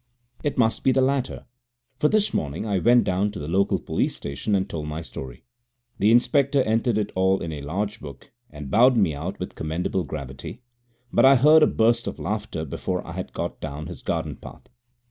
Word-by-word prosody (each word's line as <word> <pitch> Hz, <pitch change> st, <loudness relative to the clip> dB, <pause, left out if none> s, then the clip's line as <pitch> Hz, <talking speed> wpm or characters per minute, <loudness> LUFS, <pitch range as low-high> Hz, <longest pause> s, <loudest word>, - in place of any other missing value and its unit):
It 145 Hz, -, -1 dB
must 115 Hz, -3 st, +1 dB
be 135 Hz, -, +4 dB
the 130 Hz, -, +2 dB
latter, 135 Hz, -1 st, -1 dB, 0.5 s
for 150 Hz, -, +4 dB
this 215 Hz, -1 st, +1 dB
morning 75 Hz, +7 st, -2 dB
I 100 Hz, -3 st, 0 dB
went 120 Hz, +4 st, +5 dB
down 95 Hz, +3 st, 0 dB
to -, -, -6 dB
the 75 Hz, -, -6 dB
local 95 Hz, +4 st, +2 dB
police -, -, -1 dB
station 70 Hz, +9 st, -2 dB
and 95 Hz, 0 st, 0 dB
told 75 Hz, -5 st, -5 dB
my 75 Hz, +2 st, -5 dB
story. 65 Hz, -5 st, -9 dB, 0.6 s
The 105 Hz, -, +4 dB
inspector 140 Hz, +3 st, +3 dB
entered 115 Hz, 0 st, +1 dB
it 105 Hz, -2 st, -1 dB
all 95 Hz, +1 st, +2 dB
in 85 Hz, -, -5 dB
a 75 Hz, -2 st, -6 dB
large 100 Hz, +9 st, -3 dB
book 70 Hz, -3 st, -11 dB, 0.2 s
and 75 Hz, -2 st, -9 dB
bowed 125 Hz, +3 st, +5 dB
me 95 Hz, -8 st, +3 dB
out 85 Hz, +7 st, -5 dB
with 90 Hz, -, -5 dB
commendable 85 Hz, +4 st, -2 dB
gravity, 70 Hz, -, -7 dB, 0.5 s
but -, -, +4 dB
I 135 Hz, +1 st, +8 dB
heard 150 Hz, +5 st, +6 dB
a -, -, +6 dB
burst 115 Hz, +1 st, +2 dB
of -, -, -4 dB
laughter 105 Hz, -6 st, -3 dB
before 70 Hz, -, -3 dB
I -, -, -8 dB
had -, -, -6 dB
got -, -, -5 dB
down 75 Hz, +2 st, -5 dB
his -, -, -9 dB
garden -, -, -3 dB
path. -, -, -13 dB
100 Hz, 205 wpm, -24 LUFS, 80-120 Hz, 0.6 s, I